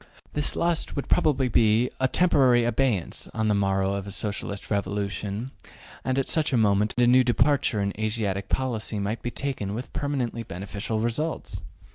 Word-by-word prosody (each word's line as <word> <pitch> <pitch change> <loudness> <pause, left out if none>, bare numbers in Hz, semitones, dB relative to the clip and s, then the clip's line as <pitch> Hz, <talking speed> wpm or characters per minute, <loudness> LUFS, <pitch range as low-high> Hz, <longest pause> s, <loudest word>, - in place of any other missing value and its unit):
This 150 0 -1
lust 170 -1 0
would 140 - -3
probably 135 -4 +2
be 115 +1 +3
in 130 - +4
temporary 130 -7 +4
abeyance 120 -6 0
on 110 -1 +1
the - - +3
morrow 95 -1 +1
of 100 0 -4
a - - -5
Socialist 100 0 -3
revolution, 100 +3 -2 0.5
and 130 0 -1
at 135 - 0
such 155 -3 +1
a 130 - +2
moment 105 -1 +2
a 120 - +5
new 125 +1 +6
departure 125 -1 +2
in 100 0 -1
Asiatic 105 -3 -1
policy 115 -5 -1
might 100 +3 -2
be 120 - -3
taken 120 -7 -3
with 125 +3 -6
permanently 130 -5 -2
beneficial 100 +2 -4
results. 115 - -2
115 Hz, 165 wpm, -26 LUFS, 100-130 Hz, 0.5 s, new